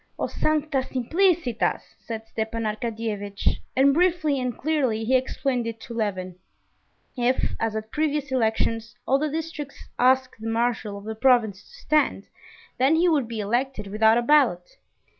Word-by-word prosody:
"O -, -, -1 dB
sancta 305 Hz, -2 st, 0 dB
simplicitas!" 290 Hz, -, 0 dB
said 225 Hz, -1 st, -7 dB
Stepan 225 Hz, +1 st, -3 dB
Arkadyevitch, 215 Hz, -2 st, -2 dB, 0.2 s
and 275 Hz, +1 st, +5 dB
briefly 325 Hz, -4 st, +2 dB
and 250 Hz, -2 st, -3 dB
clearly 265 Hz, -7 st, 0 dB
he 260 Hz, +3 st, +3 dB
explained 255 Hz, -1 st, 0 dB
it 225 Hz, 0 st, -5 dB
to 235 Hz, -, -8 dB
Levin. 185 Hz, -5 st, -3 dB, 0.8 s
If, 250 Hz, 0 st, +1 dB
as 225 Hz, -1 st, -1 dB
at 220 Hz, 0 st, -5 dB
previous 300 Hz, -2 st, -1 dB
elections, 225 Hz, -1 st, 0 dB
all 270 Hz, +1 st, +3 dB
the 305 Hz, +1 st, 0 dB
districts 300 Hz, -2 st, -6 dB
asked 260 Hz, +1 st, +3 dB
the 225 Hz, -, -3 dB
marshal 225 Hz, -3 st, -1 dB
of 200 Hz, -, -10 dB
the 220 Hz, +1 st, -4 dB
province 220 Hz, -4 st, +3 dB
to 485 Hz, -, -17 dB
stand, 305 Hz, -1 st, +1 dB, 0.5 s
then 270 Hz, +5 st, +4 dB
he 340 Hz, +2 st, +3 dB
would 290 Hz, -7 st, +2 dB
be 225 Hz, -2 st, -4 dB
elected 240 Hz, +3 st, -1 dB
without 220 Hz, +3 st, +3 dB
a 240 Hz, -, +1 dB
ballot. 240 Hz, -11 st, +3 dB
245 Hz, 155 wpm, -25 LUFS, 220-280 Hz, 0.8 s, and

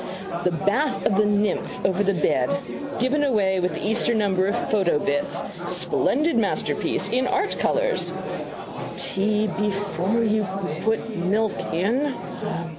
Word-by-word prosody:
The -, -, +5 dB
Bath 230 Hz, -, 0 dB
of 210 Hz, -, +3 dB
the 210 Hz, +1 st, +4 dB
Nymph 205 Hz, -1 st, 0 dB
over 190 Hz, +1 st, +2 dB
the 200 Hz, -1 st, +2 dB
bed. 130 Hz, -7 st, +2 dB, 0.5 s
Given 265 Hz, +4 st, +2 dB
away 200 Hz, -8 st, +2 dB
with 180 Hz, 0 st, 0 dB
the -, -, -3 dB
Easter 230 Hz, +2 st, +2 dB
number 195 Hz, -3 st, +2 dB
of 200 Hz, -, 0 dB
Photo 190 Hz, -7 st, +3 dB
Bits: 145 Hz, -1 st, -1 dB, 0.2 s
Splendid 260 Hz, -, +1 dB
masterpiece 195 Hz, -7 st, 0 dB
in 255 Hz, +4 st, +1 dB
art 395 Hz, +2 st, 0 dB
colours. -, -, +1 dB, 0.9 s
Tea 210 Hz, +2 st, +1 dB
before 200 Hz, +1 st, 0 dB
you 215 Hz, -1 st, +2 dB, 0.4 s
put 225 Hz, 0 st, -1 dB
milk 205 Hz, +4 st, +1 dB, 0.2 s
in. 245 Hz, -, +1 dB
210 Hz, 130 wpm, -24 LUFS, 190-235 Hz, 0.9 s, The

